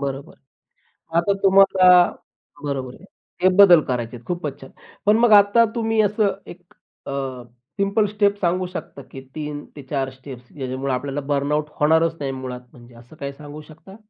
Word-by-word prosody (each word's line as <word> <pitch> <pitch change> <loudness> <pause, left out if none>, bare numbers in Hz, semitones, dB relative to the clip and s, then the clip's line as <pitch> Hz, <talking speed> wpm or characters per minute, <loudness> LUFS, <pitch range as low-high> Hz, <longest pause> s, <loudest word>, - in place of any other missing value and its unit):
बरोबर. 140 +1 -5 0.8
आता 200 +4 +2
तुम्हाला 195 -1 +5 0.8
बरोबर 135 -3 -4
आहे. - - -17 0.4
ते 185 - +6
बदल 180 -5 +8
करायचेत. 120 -1 -4
खूपच 170 -6 -5
छान! 135 - -12 0.4
पण 210 +1 +5
मग 235 -2 +4
आता 205 +3 +6
तुम्ही 225 -1 0
असं 205 -1 +1
एक 180 +1 -12 0.4
अ, - - -5 0.7
सिंपल 200 +2 +2
स्टेप 205 0 +1
सांगू 180 0 0
शकता 140 - -8
की 135 - -9
3 150 -1 -6
ते 145 - -9
4 135 0 -3
स्टेप्स 130 -2 -13
ज्याच्यामुळे 130 0 -4
आपल्याला 140 +2 -4
बर्नआउट 145 +2 0
होणारच 160 +2 +3
नाही 135 -1 -3
मुळात, 130 -1 -7
म्हणजे 120 -1 -17
असं 120 +6 -16
काही 140 0 -4
सांगू 150 +1 -11
शकता? 160 +6 -15
150 Hz, 155 wpm, -21 LUFS, 135-195 Hz, 0.8 s, बदल